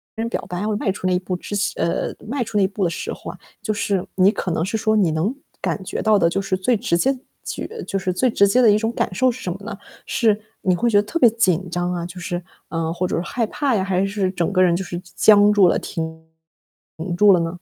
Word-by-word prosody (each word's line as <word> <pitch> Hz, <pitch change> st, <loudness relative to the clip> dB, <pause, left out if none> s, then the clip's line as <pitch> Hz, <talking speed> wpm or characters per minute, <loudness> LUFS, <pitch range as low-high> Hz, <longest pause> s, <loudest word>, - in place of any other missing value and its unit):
人 225 Hz, +1 st, -2 dB
表 -, -, -3 dB
白， 180 Hz, +1 st, -3 dB
要 210 Hz, 0 st, -1 dB
迈 195 Hz, -, 0 dB
出 185 Hz, -, -7 dB
那 185 Hz, -, +2 dB
一 180 Hz, -, +2 dB
步 185 Hz, 0 st, -4 dB
之 205 Hz, -, -6 dB, 0.2 s
呃， 170 Hz, +1 st, -1 dB
迈 255 Hz, +1 st, -1 dB
出 215 Hz, -1 st, -4 dB
那 200 Hz, -, +4 dB
一 -, -, +3 dB
步 195 Hz, 0 st, -3 dB
的 170 Hz, -, +2 dB
时 -, -, -4 dB
候 -, -, -8 dB
啊， -, -, -13 dB, 0.2 s
就 215 Hz, -, -1 dB
是 200 Hz, -3 st, -1 dB
你 190 Hz, +2 st, +5 dB
可 185 Hz, -, -3 dB
能 165 Hz, 0 st, 0 dB
是 220 Hz, +3 st, -2 dB
说 215 Hz, 0 st, +1 dB
你 185 Hz, -7 st, +3 dB
能 170 Hz, +10 st, 0 dB, 0.3 s
感 -, -, -2 dB
觉 -, -, -4 dB
到 215 Hz, -1 st, +4 dB
的 170 Hz, -, +3 dB
就 195 Hz, +3 st, -1 dB
是 190 Hz, -1 st, -1 dB
最 225 Hz, +5 st, +1 dB
直 200 Hz, -6 st, 0 dB
接 265 Hz, +7 st, +1 dB, 0.3 s
取 -, -, -4 dB, 0.2 s
就 195 Hz, -, -1 dB
是 185 Hz, -1 st, -2 dB
最 255 Hz, +7 st, +2 dB
直 200 Hz, -2 st, +4 dB
接 250 Hz, +5 st, +3 dB
的 220 Hz, -3 st, +6 dB
一 210 Hz, -, +4 dB
种 225 Hz, +1 st, -1 dB
感 -, -, -1 dB
受 255 Hz, +6 st, +3 dB
是 260 Hz, +2 st, -9 dB
什 180 Hz, -, -2 dB
么 -, -, -8 dB
呢？ 225 Hz, -, -6 dB, 0.3 s
是 225 Hz, -5 st, +2 dB, 0.2 s
你 185 Hz, -3 st, +2 dB
会 235 Hz, +5 st, +1 dB
觉 205 Hz, -, +4 dB
得 205 Hz, -, +4 dB
特 335 Hz, +10 st, -3 dB
别 240 Hz, -, +7 dB
紧 185 Hz, -6 st, +1 dB
张 175 Hz, +1 st, -1 dB
啊， 170 Hz, -1 st, -3 dB
就 180 Hz, +1 st, -9 dB
是， 175 Hz, 0 st, -3 dB, 0.3 s
啊， 165 Hz, -1 st, -2 dB
或 180 Hz, +1 st, -1 dB
者 -, -, -2 dB
是 -, -, 0 dB
说 -, -, -8 dB
害 235 Hz, -2 st, 0 dB
怕 275 Hz, -2 st, 0 dB
呀， 190 Hz, -, +1 dB
还 190 Hz, 0 st, +1 dB
是 195 Hz, -1 st, -1 dB
整 175 Hz, 0 st, -1 dB
个 185 Hz, -, +3 dB
人 170 Hz, -2 st, +3 dB
就 190 Hz, -, -2 dB
是 175 Hz, -1 st, -5 dB
僵 195 Hz, +3 st, +4 dB
僵 210 Hz, -, +5 dB
住 200 Hz, -3 st, +6 dB
了、 -, -, +1 dB
停 160 Hz, 0 st, -5 dB, 0.9 s
住 205 Hz, 0 st, +7 dB
了 175 Hz, -, +4 dB
呢？ 165 Hz, -, 0 dB
195 Hz, 300 characters per minute, -21 LUFS, 180-215 Hz, 0.9 s, 别